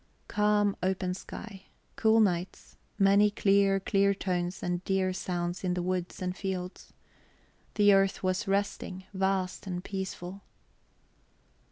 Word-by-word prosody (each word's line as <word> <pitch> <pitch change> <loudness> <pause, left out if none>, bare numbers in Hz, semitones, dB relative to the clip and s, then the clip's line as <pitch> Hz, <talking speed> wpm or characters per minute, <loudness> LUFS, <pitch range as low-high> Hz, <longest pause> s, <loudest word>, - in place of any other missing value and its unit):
Calm, 210 -1 +2
open 185 -1 0
sky, 195 +1 -9 0.3
cool 220 0 +4
nights, 185 -4 -1 0.2
many 200 +1 +5
clear, 200 -1 +3
clear 200 0 +2
tones 180 -1 -2
and 180 0 -2
dear 190 -1 +1
sounds 175 -1 -3
in 180 -1 0
the 180 - -1
woods 180 0 -3
and 180 0 -2
fields. 185 -1 -5 0.8
The 205 -1 +6
earth 195 0 +2
was 185 0 0
resting, 195 -1 -2
vast 190 0 -1
and 180 -1 -4
peaceful... 190 -1 -5
190 Hz, 125 wpm, -29 LUFS, 180-200 Hz, 0.8 s, The